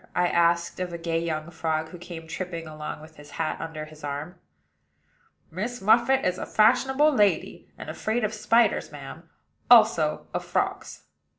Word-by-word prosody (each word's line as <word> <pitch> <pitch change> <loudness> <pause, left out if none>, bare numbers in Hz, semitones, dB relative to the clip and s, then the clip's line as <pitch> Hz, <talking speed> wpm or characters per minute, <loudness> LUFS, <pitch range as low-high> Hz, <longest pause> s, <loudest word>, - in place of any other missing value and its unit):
I 180 0 +2
asked 170 0 +1
of 180 -1 -3
a 170 - -5
gay 165 -1 -1
young 160 -1 -3
frog 160 -1 -2
who 180 - -11
came 170 -2 -9
tripping 170 0 -5
along 155 -1 -7
with 155 0 -15
his 145 0 -13
hat 160 -2 -2
under 160 -2 -6
his 155 0 -15
arm. 145 +4 -5 1.2
"Miss 225 +9 -4
Muffit 235 +6 +3
is 180 0 0
a - - -4
fashionable 265 +7 +3
lady, 205 -6 +1
and - - -9
afraid 220 +2 -2
of 215 0 -1
spiders, 230 +2 +2
madam; - - -10 0.4
also - - +5
of - - -2
frogs." - - -3
170 Hz, 165 wpm, -26 LUFS, 160-215 Hz, 1.2 s, also